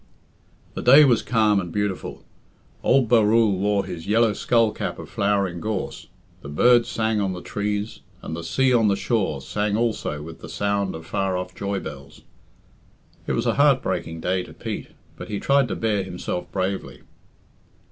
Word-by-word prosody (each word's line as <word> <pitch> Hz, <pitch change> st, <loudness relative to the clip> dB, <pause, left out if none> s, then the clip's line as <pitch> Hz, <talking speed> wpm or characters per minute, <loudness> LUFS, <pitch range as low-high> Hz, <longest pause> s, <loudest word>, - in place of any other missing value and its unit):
The -, -, -5 dB
day 140 Hz, +5 st, +8 dB
was 120 Hz, -5 st, +3 dB
calm 110 Hz, -4 st, +2 dB
and 90 Hz, -3 st, -5 dB
beautiful. 105 Hz, 0 st, -3 dB, 0.6 s
Old 135 Hz, -3 st, +3 dB
Barrule 110 Hz, -3 st, +4 dB
wore 100 Hz, 0 st, +1 dB
his 90 Hz, -3 st, -7 dB
yellow 110 Hz, +1 st, +3 dB
skull 115 Hz, 0 st, +2 dB
cap -, -, -4 dB
of -, -, -10 dB
flowering 100 Hz, -3 st, 0 dB
gorse, 105 Hz, 0 st, -4 dB, 0.3 s
the 70 Hz, -, -9 dB
birds 120 Hz, +10 st, +4 dB
sang 110 Hz, -1 st, 0 dB
on 95 Hz, -2 st, -1 dB
the 90 Hz, -, -7 dB
trees, 105 Hz, +1 st, -3 dB, 0.2 s
and 80 Hz, -, -5 dB
the 85 Hz, -, -6 dB
sea 130 Hz, +9 st, +2 dB
on 115 Hz, -3 st, +4 dB
the 100 Hz, -, +3 dB
shore 95 Hz, -, -1 dB
sang 105 Hz, +7 st, -1 dB
also 110 Hz, -10 st, -2 dB
with 80 Hz, +1 st, -10 dB
the 80 Hz, -, -10 dB
sound 100 Hz, +1 st, -1 dB
of 80 Hz, 0 st, -9 dB
far 95 Hz, 0 st, -1 dB
off 90 Hz, 0 st, -5 dB
joy 100 Hz, 0 st, -3 dB
bells. 70 Hz, -5 st, -10 dB, 1.1 s
It -, -, 0 dB
was -, -, -1 dB
a -, -, +2 dB
heart 140 Hz, -3 st, +4 dB
breaking 85 Hz, -3 st, -3 dB
day 90 Hz, +2 st, 0 dB
to -, -, -11 dB
Pete, -, -, -6 dB, 0.3 s
but -, -, -8 dB
he 105 Hz, -, -3 dB
tried 140 Hz, -1 st, +3 dB
to -, -, -3 dB
bear 110 Hz, -3 st, 0 dB
himself 90 Hz, -1 st, -5 dB
bravely. 95 Hz, 0 st, -3 dB
100 Hz, 180 wpm, -23 LUFS, 90-115 Hz, 1.1 s, day